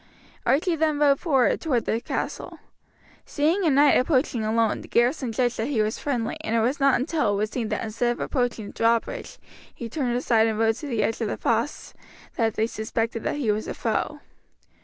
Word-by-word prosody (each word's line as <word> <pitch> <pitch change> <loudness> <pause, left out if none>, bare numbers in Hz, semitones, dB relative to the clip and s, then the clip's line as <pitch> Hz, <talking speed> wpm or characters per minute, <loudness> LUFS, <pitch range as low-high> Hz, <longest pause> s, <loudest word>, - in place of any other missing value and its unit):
Archie 330 +6 +2
then 310 -1 +1
rode 285 -2 +4
forward 270 -8 +2
toward 255 -8 0
the 225 - -1
castle. - - -4 0.7
Seeing 325 +7 0
a 330 - +3
knight 285 0 +5
approaching 255 -3 +1
alone 220 0 +1
the - - -11
garrison 245 +1 +1
judged 245 +1 0
that 225 - -1
he 245 -7 +1
was 215 +1 -2
friendly, 245 -6 -2
and 220 - -1
it - - +3
was 250 +6 0
not 275 -2 +4
until 285 -5 0
it - - -1
was 215 +2 -1
seen 230 -4 -3
that - - -2
instead 230 +2 0
of - - -12
approaching 245 -4 -1
the - - -9
drawbridge 230 - 0 0.3
he 235 - -7
turned 245 0 -2
aside 230 -3 +3
and 220 -1 -1
rode 225 0 +3
to 295 - -7
the 230 -6 0
edge 225 +3 -1
of 225 - 0
the - - -3
fosse, 230 +5 -1 0.4
that 225 -2 0
they 220 - +1
suspected 225 +1 -3
that - - -2
he 260 -7 0
was 210 +1 -2
a - - -4
foe. - - -2
240 Hz, 210 wpm, -25 LUFS, 225-280 Hz, 0.7 s, knight